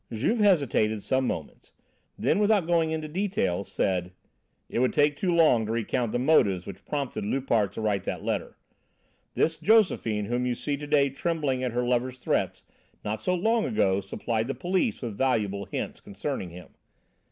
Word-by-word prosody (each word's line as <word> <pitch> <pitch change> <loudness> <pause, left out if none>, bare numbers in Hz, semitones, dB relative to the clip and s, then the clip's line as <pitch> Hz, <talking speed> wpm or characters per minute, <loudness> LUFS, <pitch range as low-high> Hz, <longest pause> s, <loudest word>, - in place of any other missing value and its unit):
Juve 135 - 0
hesitated 140 - +2
some 130 -1 +1
moments; - - -6 0.4
then, - - +1
without 205 -3 +3
going 165 -1 +2
into 160 -1 -3
details, 150 - -1
said: 90 -1 -1 0.5
"It - - -2
would 130 0 +2
take 145 0 +3
too 180 +4 0
long 155 -10 +4
to - - -2
recount 115 +1 -1
the - - 0
motives 115 - +3
which 100 - -9
prompted 140 -7 -3
Loupart 110 -3 +1
to - - -5
write 105 -2 0
that - - -4
letter. - - -3 0.8
This 160 0 +1
Josephine 180 - +3
whom 120 +3 -1
you 125 - 0
see 145 +4 -2
to 145 +1 -7
day 140 -2 +3
trembling 140 -3 -1
at 125 -2 -2
her 125 +1 0
lover's 125 +1 0
threat 125 - -1 0.4
not 105 +1 -2
so 180 +11 0
long 225 +5 +2
ago 100 - +1
supplied 110 +3 -2
the 135 - -3
police 185 - -1
with 115 -4 -4
valuable 105 -6 0
hints - - -5
concerning 100 -1 -4
him. 90 +2 -11
130 Hz, 175 wpm, -27 LUFS, 110-160 Hz, 0.8 s, long